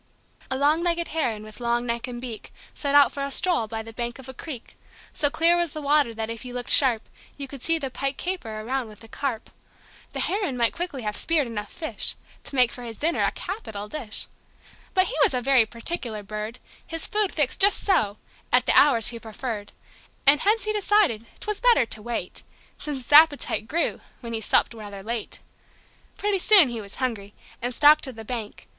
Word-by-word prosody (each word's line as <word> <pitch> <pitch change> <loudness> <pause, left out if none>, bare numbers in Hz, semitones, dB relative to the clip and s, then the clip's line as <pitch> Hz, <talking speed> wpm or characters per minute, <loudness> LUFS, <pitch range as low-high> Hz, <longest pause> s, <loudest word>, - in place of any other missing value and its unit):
A 260 - -2
long 295 +4 +2
legged 340 -1 -1
Heron, 240 -10 -2
with 215 +1 -13
long 240 0 0
neck 235 0 -3
and 245 -1 -6
beak, 240 -3 -8 0.2
Set 285 -1 -1
out 285 -1 +7
for 280 - -6
a 280 - -2
stroll 300 -4 +2
by 220 0 -5
the 225 0 -11
bank 240 0 -4
of 265 -1 -12
a 265 - -8
creek. 260 -2 -8 0.4
So 290 - +1
clear 330 +3 +3
was 345 -2 -1
the 310 - -4
water 285 -3 +3
that 225 -1 -4
if 230 +1 -7
you 250 -1 -8
looked 245 0 -4
sharp 245 -6 +6 0.3
You 280 -1 -5
could 270 -1 -10
see 330 +4 +2
the 275 -4 -5
pike 275 +1 -3
caper 285 -13 -4
around 255 +2 -3
with 215 -1 -15
the 225 - -13
carp. 245 -1 -4 0.6
The - - -3
Heron 385 -10 -1
might 235 -1 +2
quickly 335 -8 -5
have 210 -1 -3
speared 320 -4 +1
enough 215 -3 -6
fish 320 -3 -1 0.3
To - - -6
make 250 -2 +4
for 245 - -9
his 230 -3 -8
dinner 330 +3 +1
a - - +3
capital 220 - -6
dish. 230 -4 -1 0.7
But 370 0 +5
he 475 - -5
was 445 - +4
a - - +2
very 260 -4 +4
particular 230 -2 -1
bird: 215 +3 -6 0.3
His 330 0 -4
food 420 -2 +1
fixed 295 +1 0
"just 400 +1 +4
so," 215 - +2 0.3
at - - +4
the - - +3
hours 245 -6 +5
he 235 -1 -7
preferred. 220 -2 -6 0.5
And 285 +1 +6
hence 430 +5 +2
he 430 - -1
decided 400 - +2
'twas 425 -1 -3
better 485 - +4
to 220 - -4
wait, 230 -5 -4 0.4
Since 285 -4 -5
his 265 - -4
appetite 290 -7 +5
grew 330 +6 0 0.2
when 235 -2 -7
he 225 - -3
supped 220 - +2
rather 205 -3 -9
late. 230 0 -4 0.8
Pretty 410 -1 0
soon 370 -7 +8
he 235 -2 -5
was 200 -1 -9
hungry, 215 -6 -4 0.3
and 245 +1 -2
stalked 300 +3 +6
to 260 - -6
the 225 -2 -11
bank. 225 -3 -6
255 Hz, 210 wpm, -24 LUFS, 225-315 Hz, 0.8 s, soon